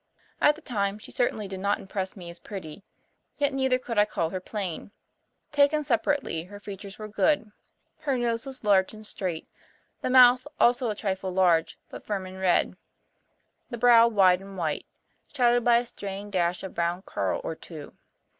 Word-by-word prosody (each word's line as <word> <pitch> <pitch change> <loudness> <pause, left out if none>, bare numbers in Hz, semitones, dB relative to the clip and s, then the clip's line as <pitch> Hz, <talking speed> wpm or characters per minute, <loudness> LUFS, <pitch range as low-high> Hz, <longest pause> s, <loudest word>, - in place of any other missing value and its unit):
At 295 - +5
the 315 - -14
time 200 -4 -1
she 215 - -12
certainly 220 -4 -1
did 190 -1 -6
not 200 +2 +1
impress 190 -1 -5
me 175 -2 -8
as 170 - -11
pretty, 185 -3 -8 0.6
yet 285 -1 +1
neither 265 -1 +2
could 235 -4 -2
I 210 - +6
call 165 -6 -2
her 185 - -3
plain. 185 -3 -5 0.6
Taken 290 +1 +3
separately, 245 - 0
her 205 +2 -11
features 200 0 -9
were 215 - -7
good. 220 +1 +1 0.5
Her 285 -4 -1
nose 235 +1 -1
was 265 -2 -5
large 200 0 +3
and 215 0 -11
straight, 180 -6 -4 0.5
the - - -1
mouth 250 0 +6
also 240 0 +3
a 210 - -2
trifle 190 -2 -3
large 180 -3 +2
but - - -9
firm 200 -3 -3
and 185 0 -9
red, 185 -2 +2 0.9
the 240 - -5
brow 235 0 +7
wide 190 -5 +4
and 195 0 -11
white, 160 -4 -2 0.4
shadowed 245 -3 +3
by 235 0 +5
a 240 - 0
straying 200 -3 -7
dash 175 -1 0
of 190 - -7
brown 175 +2 -1
curl - - -2
or - - -3
two. - - -11
205 Hz, 180 wpm, -27 LUFS, 190-245 Hz, 0.9 s, brow